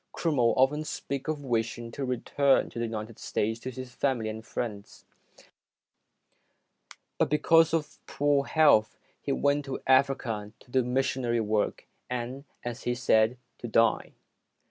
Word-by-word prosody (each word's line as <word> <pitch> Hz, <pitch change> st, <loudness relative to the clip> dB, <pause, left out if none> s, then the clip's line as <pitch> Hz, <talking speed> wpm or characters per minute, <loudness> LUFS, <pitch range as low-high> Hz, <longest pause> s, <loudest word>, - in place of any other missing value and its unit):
Crummell 135 Hz, -8 st, +1 dB
often 140 Hz, +4 st, +3 dB
spoke 140 Hz, -2 st, -5 dB
of 155 Hz, -2 st, -2 dB
wishing 115 Hz, -1 st, -2 dB
to 140 Hz, -, -5 dB
return 135 Hz, +2 st, +1 dB
to -, -, -6 dB
the 120 Hz, -, 0 dB
United 110 Hz, 0 st, -6 dB
States 110 Hz, +2 st, -2 dB
to 130 Hz, +2 st, -6 dB
see 130 Hz, -, -7 dB
his 125 Hz, -1 st, -11 dB
family 120 Hz, -6 st, 0 dB
and 110 Hz, 0 st, -6 dB
friends, 110 Hz, -3 st, -6 dB, 2.1 s
but -, -, +2 dB
because 165 Hz, +1 st, +4 dB
of 160 Hz, -2 st, -2 dB
poor 145 Hz, -1 st, +1 dB
health, 145 Hz, -9 st, +4 dB, 0.2 s
he 140 Hz, -, -3 dB
went 145 Hz, +1 st, +1 dB
to 135 Hz, -1 st, -4 dB
Africa 130 Hz, -6 st, +1 dB
to 125 Hz, -, -20 dB
do 130 Hz, 0 st, +3 dB
missionary 125 Hz, -1 st, 0 dB
work 105 Hz, -1 st, -1 dB, 0.2 s
and, 125 Hz, +3 st, -4 dB, 0.2 s
as 120 Hz, 0 st, -4 dB
he 120 Hz, -, -1 dB
said, 115 Hz, -1 st, +3 dB, 0.2 s
to 120 Hz, -, -5 dB
die. 115 Hz, 0 st, +2 dB
125 Hz, 145 wpm, -28 LUFS, 115-140 Hz, 2.1 s, because